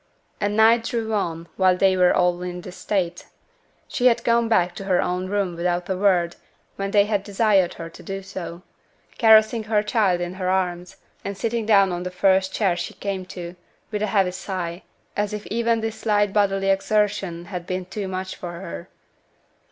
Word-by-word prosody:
And 205 +1 -1
night 225 +1 +5
drew 225 -2 -2
on 170 -5 -2
while 185 -1 +4
they 190 0 +4
were 180 -1 +4
all 180 0 +2
in 180 0 -5
this 180 0 -10
state. 180 -4 -2 0.6
She 250 - +2
had 235 -1 +3
gone 235 0 +3
back 180 -5 +2
to 195 - -8
her 185 -2 +2
own 180 +1 -1
room 195 -3 -1
without 175 +1 -1
a 190 - 0
word 180 -3 +2 0.4
when 195 0 -3
they 200 0 +4
had 205 -2 0
desired 200 -3 +2
her 165 - -7
to - - -13
do 195 0 -6
so; 180 -2 -7 0.6
caressing 220 -1 +5
her 210 -1 +1
child 210 -5 +2
in 175 0 -3
her 185 - 0
arms, 180 -1 -1 0.3
and 200 -1 -5
sitting 230 0 -2
down 195 -3 +5
on 175 0 -3
the 180 - -3
first 190 +1 +2
chair 190 -3 +1
she 175 - -5
came 195 -2 -4
to, 175 -2 -7 0.4
with 210 -1 -2
a 215 - +1
heavy 195 -3 +2
sigh, 180 -2 -5 0.3
as 205 0 -1
if 210 -1 -5
even 230 0 +1
this 220 0 -4
slight 205 -2 +1
bodily 195 -1 +2
exertion 195 -3 0
had 175 -1 -5
been 185 0 -3
too 195 +2 -5
much 185 0 -4
for 175 -1 -7
her. 85 - -8
195 Hz, 190 wpm, -23 LUFS, 180-210 Hz, 0.6 s, night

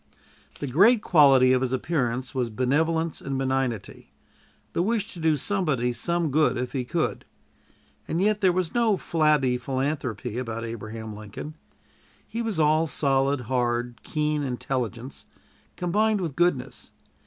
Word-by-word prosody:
The - - -3
great 205 - +4
quality 135 -6 +6
of 130 - +2
his 130 -1 -1
appearance 130 -2 -1
was 125 -3 -1
benevolence 160 +7 0
and 135 -1 -3
benignity: 130 -4 -2 0.6
the - - +1
wish 220 +2 -1
to 175 - -9
do 160 -2 +2
somebody 150 - 0
some 170 +6 -1
good 155 -2 +2
if 125 0 -3
he 130 -3 -1
could; 155 +6 -2 0.8
and 165 - -1
yet 210 +2 +2
there 190 -2 +5
was 175 -2 -1
no 230 -4 +2
flabby 150 -8 +2
philanthropy 130 -4 -3
about 115 -2 -4
Abraham 110 -1 -7
Lincoln. 105 +8 -8 0.7
He 230 - -4
was 220 -7 -2
all 155 +1 +3
solid, 140 -2 +1
hard, 120 -1 -1
keen 150 -1 -1
intelligence 125 -2 -4 0.5
combined 210 +4 +1
with 165 -7 -3
goodness. 175 -7 0
140 Hz, 140 wpm, -25 LUFS, 125-165 Hz, 0.8 s, quality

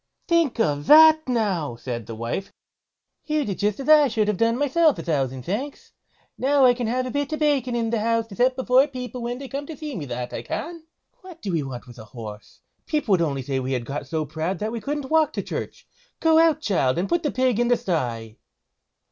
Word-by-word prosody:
"Think 335 -8 +2
of 145 -7 0
that, 315 -1 +7
now!" 195 - 0
said 115 -2 -6
the 115 - -6
wife; 115 - -4 0.8
"you 305 -1 0
did 195 -3 -4
just 210 +2 0
as 270 - -6
I 305 -2 +7
should 220 -3 0
have 210 - +1
done 230 +2 +2
myself; 295 +2 +3
a - - -6
thousand 135 -6 -1
thanks! 255 +10 -5 0.5
Now 275 +1 +4
I 250 - +6
can 240 -2 -3
have 255 +3 -1
a 255 - -4
bit 285 +2 -2
of - - -1
bacon 275 -5 +1
in 230 -1 -1
the 230 - 0
house 230 +1 +1
to 195 - -9
set 255 +4 +2
before 260 +2 +3
people 250 -2 -7
when 240 +1 -3
they 275 +1 -8
come 280 +2 -5
to 320 - -8
see 300 -4 -6
me, 150 - -5
that 125 -1 -5
I - - -4
can. 335 -1 -6 0.3
What 370 -5 -14
do 195 - -2
we 165 -3 0
want 130 -3 -7
with 120 -2 -13
a 110 - -10
horse? 105 -1 -10 0.3
People 300 -8 -1
would 185 -3 +4
only 140 -5 -1
say 135 0 -2
we 130 +1 -3
had 125 -2 -2
got 140 +3 -5
so 160 -1 -2
proud 160 +5 -3
that 215 +5 -3
we 230 -1 -5
couldn't 285 +3 -4
walk 320 -1 +3
to - - -3
church. - - -6 0.3
Go 320 -1 +4
out, 325 -2 +3
child, 165 - +1
and 180 +3 0
put 345 - +2
up - - -13
the 295 - +1
pig 255 -3 +1
in 240 - +2
the 245 0 +3
sty." 120 - -3
230 Hz, 240 wpm, -23 LUFS, -, 0.8 s, that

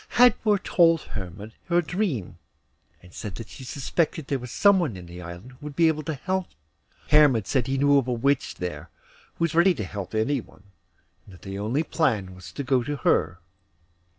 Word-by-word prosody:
Hadvor 230 -3 +5
told 165 -4 +3
Hermod 100 +2 -7
her 175 0 +2
dream, 175 - -2 0.6
and 90 0 -16
said 100 -4 -6
she 135 - -11
suspected 145 +4 -1
there 135 0 -1
was 125 0 -8
some 200 - +4
one 150 - -2
in 90 - -9
the 85 +1 -10
island 85 +7 -9
who 130 - -18
would 145 -1 -7
be 165 +1 +4
able 155 -1 +1
to 155 +1 -4
help 185 +6 -2
them. - - -31 0.5
Hermod 145 -8 +5
said 125 0 0
he 135 0 0
knew 145 +1 +5
of 130 - -3
a - - 0
Witch 135 +3 0
there, 85 -2 -6 0.5
who - - -2
was 165 - +2
very 165 - +2
ready 190 +1 +4
to 110 - -4
help 100 +1 -6
anyone, 110 -3 -2 0.6
and 95 - -14
that - - -18
the 95 0 -6
only 120 +9 0
plan 110 - 0
was 95 0 -11
to 140 - -5
go 130 -1 +2
to 145 +4 -3
her. 95 -8 +1
130 Hz, 205 wpm, -25 LUFS, 100-160 Hz, 0.6 s, Hadvor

